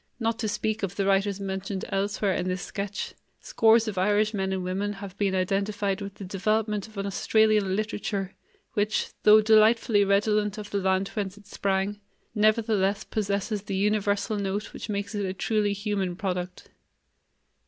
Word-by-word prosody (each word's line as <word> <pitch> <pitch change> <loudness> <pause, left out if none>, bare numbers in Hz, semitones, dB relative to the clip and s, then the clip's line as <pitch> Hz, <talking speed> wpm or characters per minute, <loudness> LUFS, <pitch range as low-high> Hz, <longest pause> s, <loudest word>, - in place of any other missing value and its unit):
Not 225 -1 -1
to 220 - -1
speak 215 +1 -1
of 195 -1 -3
the 200 - 0
writers 195 0 +2
mentioned 190 0 -4
elsewhere 200 0 0
in 180 - -2
this 185 0 -2
sketch, 200 0 -4 0.3
scores 225 0 +3
of 200 -4 -2
Irish 210 +3 +2
men 190 -2 -1
and 190 -1 -2
women 195 +3 -2
have 195 -2 -9
been 195 -2 +1
identified 195 +1 0
with 200 0 -6
the - - -9
development 210 +2 -1
of 220 -1 -16
an 195 - -2
Australian 210 -1 +2
literature 205 -2 -3 0.4
which, 210 +1 0
though 215 +1 +7
delightfully 220 0 +5
redolent 210 +1 +2
of 210 -1 -7
the 200 - 0
land 190 0 +1
whence 200 -2 -4
it 205 - -16
sprang, 200 0 -1 0.3
nevertheless 215 -2 +2
possesses 205 0 -2
the 200 -1 -4
universal 205 +1 +1
note 200 +1 -3
which - - -7
makes 200 0 -3
it 205 -1 -2
a 190 -1 -3
truly 210 +1 +1
human 200 -3 -2
product. 180 -2 -4
200 Hz, 165 wpm, -26 LUFS, 195-215 Hz, 0.4 s, though